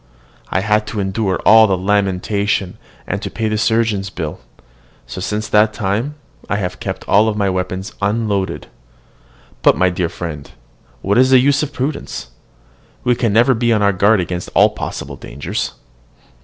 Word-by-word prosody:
I 95 Hz, -, 0 dB
had 105 Hz, +1 st, +1 dB
to 110 Hz, -, -4 dB
endure 95 Hz, 0 st, -1 dB
all 110 Hz, 0 st, +8 dB
the 95 Hz, -2 st, +1 dB
lamentation, 100 Hz, +1 st, 0 dB, 0.3 s
and -, -, -3 dB
to -, -, -4 dB
pay 110 Hz, -, -2 dB
the 110 Hz, -, 0 dB
surgeon's 110 Hz, -4 st, +1 dB
bill; 80 Hz, -5 st, -5 dB, 0.7 s
so, 65 Hz, +9 st, -7 dB
since 105 Hz, +3 st, -2 dB
that 105 Hz, 0 st, +4 dB
time, 110 Hz, +8 st, -2 dB, 0.3 s
I -, -, +1 dB
have 95 Hz, -3 st, -3 dB
kept -, -, -5 dB
all 110 Hz, +2 st, +4 dB
my 100 Hz, -2 st, +1 dB
weapons 95 Hz, +1 st, -3 dB
unloaded. 100 Hz, -2 st, -1 dB, 1.0 s
But, -, -, +4 dB
my 90 Hz, +1 st, +3 dB
dear 90 Hz, -1 st, -1 dB
friend, 80 Hz, -5 st, -7 dB, 0.5 s
what 100 Hz, +4 st, +2 dB
is 130 Hz, 0 st, +5 dB
the 130 Hz, -, +7 dB
use 140 Hz, +2 st, +3 dB
of 150 Hz, -1 st, -3 dB
prudence? 135 Hz, -, -4 dB, 0.7 s
We 125 Hz, -, +3 dB
can 115 Hz, -2 st, 0 dB
never 120 Hz, +5 st, +4 dB
be 120 Hz, 0 st, +1 dB
on 105 Hz, -2 st, +2 dB
our 100 Hz, 0 st, +3 dB
guard 100 Hz, +3 st, +3 dB
against 90 Hz, 0 st, -3 dB
all -, -, +6 dB
possible -, -, -6 dB
dangers. 70 Hz, +4 st, -4 dB
105 Hz, 165 wpm, -18 LUFS, 95-110 Hz, 1.0 s, all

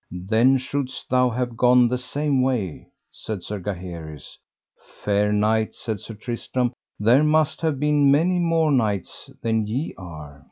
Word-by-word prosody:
Then 110 Hz, +9 st, +2 dB
shouldst 130 Hz, -1 st, -5 dB
thou 125 Hz, 0 st, +4 dB
have 120 Hz, 0 st, -3 dB
gone 125 Hz, +1 st, +5 dB
the 125 Hz, +1 st, -1 dB
same 140 Hz, +2 st, 0 dB
way, 120 Hz, -, -2 dB, 0.2 s
said 105 Hz, -5 st, -6 dB
Sir 105 Hz, -1 st, -5 dB
Gaheris. 85 Hz, -6 st, -7 dB, 0.7 s
Fair 105 Hz, 0 st, +2 dB
knight, 110 Hz, +1 st, +1 dB
said 110 Hz, -4 st, -4 dB
Sir 110 Hz, -, -9 dB
Tristram, 120 Hz, +2 st, -3 dB, 0.3 s
there 115 Hz, +7 st, +5 dB
must 155 Hz, +1 st, +2 dB
have 155 Hz, -5 st, 0 dB
been 150 Hz, -1 st, +3 dB
many 170 Hz, +6 st, +3 dB
more 165 Hz, -2 st, +2 dB
knights 105 Hz, -8 st, -1 dB
than 110 Hz, -2 st, 0 dB
ye 130 Hz, +9 st, -3 dB
are. 75 Hz, -6 st, -10 dB
120 Hz, 150 wpm, -23 LUFS, 105-135 Hz, 0.7 s, gone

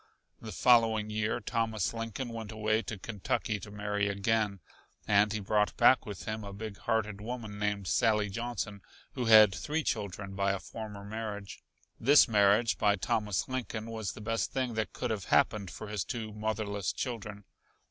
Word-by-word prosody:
The 110 Hz, -, -7 dB
following 110 Hz, +1 st, +4 dB
year 110 Hz, +2 st, 0 dB
Thomas 110 Hz, -3 st, -1 dB
Lincoln 115 Hz, +2 st, -4 dB
went 115 Hz, -2 st, -6 dB
away 110 Hz, 0 st, +1 dB
to 115 Hz, -, -6 dB
Kentucky 105 Hz, +1 st, -2 dB
to 105 Hz, -, -9 dB
marry 105 Hz, 0 st, -1 dB
again, 100 Hz, 0 st, 0 dB, 0.5 s
and 105 Hz, +1 st, +4 dB
he 110 Hz, -, -1 dB
brought 105 Hz, +1 st, +1 dB
back 130 Hz, -1 st, +5 dB
with 100 Hz, -3 st, -7 dB
him 110 Hz, 0 st, -4 dB
a 100 Hz, -, -7 dB
big 105 Hz, 0 st, -7 dB
hearted 105 Hz, -2 st, -1 dB
woman 110 Hz, -2 st, -6 dB
named 105 Hz, -1 st, -1 dB
Sally 105 Hz, +3 st, +2 dB
Johnson, 105 Hz, -1 st, -4 dB, 0.3 s
who 125 Hz, -, -2 dB
had 110 Hz, -3 st, +8 dB
three 155 Hz, -, -2 dB
children 100 Hz, -4 st, -3 dB
by 100 Hz, 0 st, +1 dB
a 100 Hz, -, -3 dB
former 105 Hz, -2 st, -8 dB
marriage. 105 Hz, -2 st, -6 dB, 0.4 s
This 145 Hz, +5 st, +6 dB
marriage 105 Hz, +1 st, +3 dB
by 105 Hz, -1 st, +4 dB
Thomas 105 Hz, 0 st, -1 dB
Lincoln 115 Hz, -3 st, -4 dB
was 110 Hz, -3 st, -4 dB
the -, -, -10 dB
best 115 Hz, +1 st, -1 dB
thing 130 Hz, -3 st, -1 dB
that 110 Hz, -1 st, -2 dB
could -, -, -3 dB
have 105 Hz, -4 st, -3 dB
happened 100 Hz, -3 st, +2 dB
for 110 Hz, -, -8 dB
his 105 Hz, -2 st, -2 dB
two 110 Hz, -4 st, -5 dB
motherless 105 Hz, -2 st, -2 dB
children. 105 Hz, -4 st, -5 dB
110 Hz, 170 wpm, -31 LUFS, 100-115 Hz, 0.5 s, had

